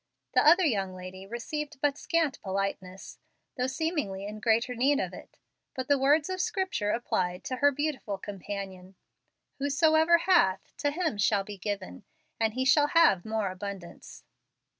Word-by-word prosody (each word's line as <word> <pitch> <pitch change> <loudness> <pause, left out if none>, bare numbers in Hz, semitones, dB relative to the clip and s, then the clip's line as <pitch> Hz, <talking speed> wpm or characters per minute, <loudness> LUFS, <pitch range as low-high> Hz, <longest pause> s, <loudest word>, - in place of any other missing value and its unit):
The - - +4
other 345 +5 +6
young 195 -9 0
lady 185 +1 -9
received 290 +6 -5
but 285 0 +1
scant 320 -3 -1
politeness, 190 -1 -4 0.4
though 250 -1 -1
seemingly 265 - -2
in 210 +1 -7
greater 230 +2 +1
need 275 +4 +2
of - - -3
it. - - -12 0.4
But 260 -1 -4
the 285 - +5
words 290 +3 +3
of 370 -1 -2
Scripture 375 - -1
applied 185 -6 -1
to 255 - -4
her 285 +2 +5
beautiful 280 -8 -3
companion, 195 -1 -7 0.6
"Whosoever 315 +4 +4
hath, 330 - +2
to 290 - 0
him 315 - -2
shall 205 -1 +2
be 200 0 -9
given, 200 0 -5 0.4
and 220 0 0
he 260 0 0
shall 290 +2 +5
have 330 - +4
more 220 -3 -1
abundance." 190 -2 -9
235 Hz, 155 wpm, -28 LUFS, 195-295 Hz, 0.6 s, other